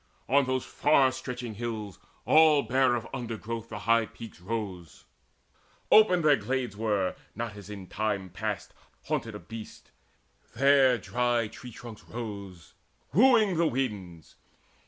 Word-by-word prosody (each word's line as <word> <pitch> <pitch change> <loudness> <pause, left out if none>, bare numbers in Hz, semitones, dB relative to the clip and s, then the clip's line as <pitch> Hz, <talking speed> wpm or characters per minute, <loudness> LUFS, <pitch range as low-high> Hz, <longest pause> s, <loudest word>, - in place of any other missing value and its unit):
On 140 +1 +4
those 130 0 -1
far 135 -3 +3
stretching 125 -3 -6
hills 110 -3 -5 0.3
All 155 -2 +6
bare 130 +1 +2
of 120 - -4
undergrowth 115 -2 -5
the - - -6
high 115 +2 +2
peaks 115 -5 -12
rose: 95 -5 -6 0.9
Open 185 -6 +6
their 150 -2 +5
glades 125 0 -2
were, 105 -3 0 0.2
not, 115 -1 -4
as 100 -1 -11
in 100 -2 -8
time 100 -1 -2
past, - - -4 0.3
Haunted - - -3
of 85 - -11
beasts: 115 -1 -10 0.6
there 135 -1 +5
dry 120 -1 0
the 110 - -6
tree 125 +3 -11
trunks 115 -1 -11
rose 100 -7 -8 0.4
Wooing 220 -5 +5
the 170 0 +3
winds. 105 - -4
115 Hz, 135 wpm, -28 LUFS, 105-130 Hz, 0.9 s, All